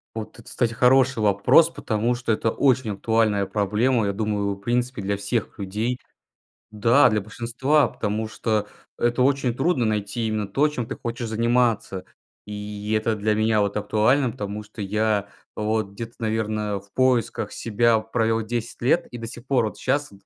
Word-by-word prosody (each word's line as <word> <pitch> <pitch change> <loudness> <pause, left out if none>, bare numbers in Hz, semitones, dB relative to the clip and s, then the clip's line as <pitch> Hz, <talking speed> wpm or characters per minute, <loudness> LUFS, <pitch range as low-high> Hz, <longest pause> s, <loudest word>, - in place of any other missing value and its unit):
Вот, 110 -1 -6
это - - -12
кстати, 120 -2 0
хороший 125 0 +3
вопрос, 105 +11 +5
потому 115 -1 -1
что 120 -2 -1
это 110 +1 0
очень 130 -4 +2
актуальная 105 -1 +1
проблема, 105 +4 +1
я 100 - 0
думаю, 100 -1 -1
в 100 - -16
принципе, 120 +1 -1
для 100 +1 -1
всех 100 +2 -3
людей. 110 +6 -2 0.7
Да, 115 +5 +5
для 105 - +1
большинства, 120 +7 +1
потому 110 +1 -2
что, 110 -2 -1 0.3
это 120 +1 +1
очень 135 -2 +2
трудно- 135 +1 +1
найти 105 +1 -1
именно 110 -2 -2
то, 140 +10 +2
чем 125 -5 -4
ты - - -5
хочешь 120 0 -5
заниматься. 115 -4 0 0.4
И 105 0 -5
это 110 +1 0
для 105 +1 0
меня, 110 0 +2
вот, 100 -1 -1
актуально, 110 +5 +2
потому 105 -3 -5
что 105 +1 -10
я, 105 0 0 0.3
вот, 105 -1 -1
где-то 115 +3 -7
наверное 110 -2 -1
в 100 +1 -21
поисках 130 -3 +1
себя 115 0 +2
провёл 115 0 0
10 115 +1 -4
лет 135 +8 +2
и 120 - -6
до 115 -1 -6
сих 120 +1 -9
пор, 130 -3 +2
вот, 105 - -5
сейчас 145 -3 -1
110 Hz, 170 wpm, -24 LUFS, 105-120 Hz, 0.7 s, вопрос